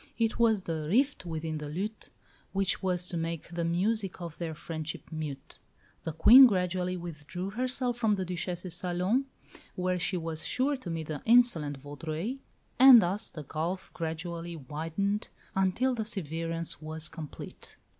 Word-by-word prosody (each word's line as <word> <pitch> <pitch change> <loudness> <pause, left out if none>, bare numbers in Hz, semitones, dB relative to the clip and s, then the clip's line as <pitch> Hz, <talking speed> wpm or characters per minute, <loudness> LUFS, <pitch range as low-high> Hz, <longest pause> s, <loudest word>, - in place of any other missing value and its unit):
It 225 0 0
was 220 -4 +4
the 160 -3 -3
"rift 260 - +2
within 160 -1 -3
the 150 -1 -6
lute" 200 +8 -4 0.4
which 195 0 +1
was 180 -2 0
to 170 - -2
make 165 -1 -3
the 170 0 -3
music 190 +4 0
of 170 -3 -7
their 165 -2 -3
friendship 160 0 -5
mute. 155 -4 -5 0.5
The 160 - -1
Queen 245 - +9
gradually 180 -2 0
withdrew 175 +2 -6
herself 250 +1 -1
from 220 -3 +2
the 190 -2 -2
Duchesse's 180 0 -3
salon, 180 +8 0 0.5
where 180 0 0
she 180 +2 0
was 160 -2 -3
sure 275 +3 +1
to 255 -9 -8
meet 165 -1 -3
the 150 -2 -5
insolent 220 - +4
Vaudreuil; 155 - -4 0.4
and 260 -2 +11
thus 200 +3 0
the 155 - -8
gulf 165 +6 -3
gradually 170 +1 -4
widened 165 - -2 0.3
until 195 +8 +2
the 225 -3 -2
severance 165 -5 -3
was 155 0 -4
complete. 155 -2 -9
175 Hz, 155 wpm, -30 LUFS, 160-205 Hz, 0.5 s, and